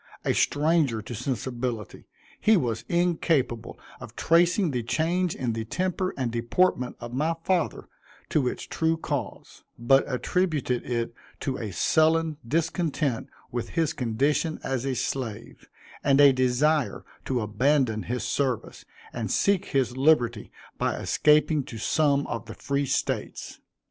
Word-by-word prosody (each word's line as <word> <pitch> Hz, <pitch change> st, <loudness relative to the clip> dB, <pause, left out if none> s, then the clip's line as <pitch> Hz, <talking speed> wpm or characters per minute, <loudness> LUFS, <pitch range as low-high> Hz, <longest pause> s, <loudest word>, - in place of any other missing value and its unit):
A -, -, +2 dB
stranger 150 Hz, -5 st, +2 dB
to 120 Hz, -, -7 dB
sensibility, 120 Hz, -2 st, -4 dB, 0.3 s
he 220 Hz, 0 st, +5 dB
was 120 Hz, -8 st, -2 dB
incapable 165 Hz, -9 st, 0 dB, 0.2 s
of -, -, -10 dB
tracing 170 Hz, +1 st, +3 dB
the 125 Hz, -2 st, -1 dB
change 170 Hz, +8 st, 0 dB
in 120 Hz, -3 st, -2 dB
the 110 Hz, 0 st, -3 dB
temper 185 Hz, -, -1 dB
and 125 Hz, -3 st, -1 dB
deportment 125 Hz, +3 st, +1 dB
of 120 Hz, 0 st, -8 dB
my 155 Hz, +5 st, 0 dB
father, 180 Hz, -2 st, 0 dB, 0.4 s
to 140 Hz, -5 st, +1 dB
its -, -, -3 dB
true 160 Hz, 0 st, 0 dB
cause; -, -, -5 dB
but 135 Hz, +3 st, +4 dB
attributed 145 Hz, -2 st, 0 dB
it 120 Hz, -1 st, -1 dB, 0.3 s
to 135 Hz, -1 st, -2 dB
a 110 Hz, -, -4 dB
sullen 160 Hz, -, +2 dB
discontent 155 Hz, -3 st, -1 dB, 0.2 s
with 120 Hz, -1 st, -3 dB
his 165 Hz, -3 st, +2 dB
condition 140 Hz, +6 st, 0 dB
as 135 Hz, -1 st, -2 dB
a 135 Hz, -1 st, -1 dB
slave, 115 Hz, -3 st, -4 dB, 0.3 s
and 140 Hz, 0 st, +4 dB
a 140 Hz, -1 st, +8 dB
desire 130 Hz, 0 st, +1 dB, 0.2 s
to 130 Hz, -2 st, 0 dB
abandon 110 Hz, +1 st, +1 dB
his 120 Hz, 0 st, -3 dB
service, 130 Hz, 0 st, -2 dB, 0.3 s
and 115 Hz, -4 st, -3 dB
seek 200 Hz, -, +2 dB
his 130 Hz, -3 st, 0 dB
liberty 125 Hz, -6 st, +2 dB, 0.3 s
by -, -, 0 dB
escaping 150 Hz, 0 st, +3 dB
to 115 Hz, -, -8 dB
some 140 Hz, +4 st, +2 dB
of 115 Hz, -1 st, -5 dB
the 110 Hz, -, -8 dB
free 140 Hz, 0 st, -1 dB
States. -, -, -2 dB
135 Hz, 140 wpm, -26 LUFS, 120-160 Hz, 0.4 s, a